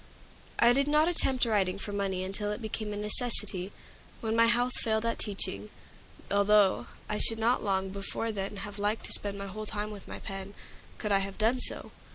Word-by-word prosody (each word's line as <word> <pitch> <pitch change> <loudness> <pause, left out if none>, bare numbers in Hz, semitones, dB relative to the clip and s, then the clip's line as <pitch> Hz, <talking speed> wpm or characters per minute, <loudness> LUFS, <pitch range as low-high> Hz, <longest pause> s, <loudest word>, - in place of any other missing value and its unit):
I 235 +1 +5
did 275 +2 +1
not 300 +2 +3
attempt 265 -7 +5
writing 200 -4 +1
for 205 - -5
money 195 -2 -2
until 205 +2 -2
it 210 - -4
became 220 -1 -4
a 205 - -4
necessity, 210 -3 +3 0.5
when 220 -2 -2
my 230 0 +5
health 245 +2 +2
failed 220 0 0
at 230 - -1
teaching, 105 - -1 0.6
although 200 -1 +3 0.2
I 210 - -2
should 225 - +2
long 200 -5 +1
before 200 +3 -3
then 200 0 -4
have 205 0 -9
liked 210 +2 -1
to - - -3
spend 200 -1 -4
my 200 - -5
whole 215 +2 -7
time 210 0 -4
with 205 -2 -9
my - - -6
pen, 195 -1 -7 0.4
could 210 - -3
I 195 - +4
have 195 0 -5
done 225 +4 +2
so. - - -4
210 Hz, 195 wpm, -29 LUFS, 195-230 Hz, 0.6 s, I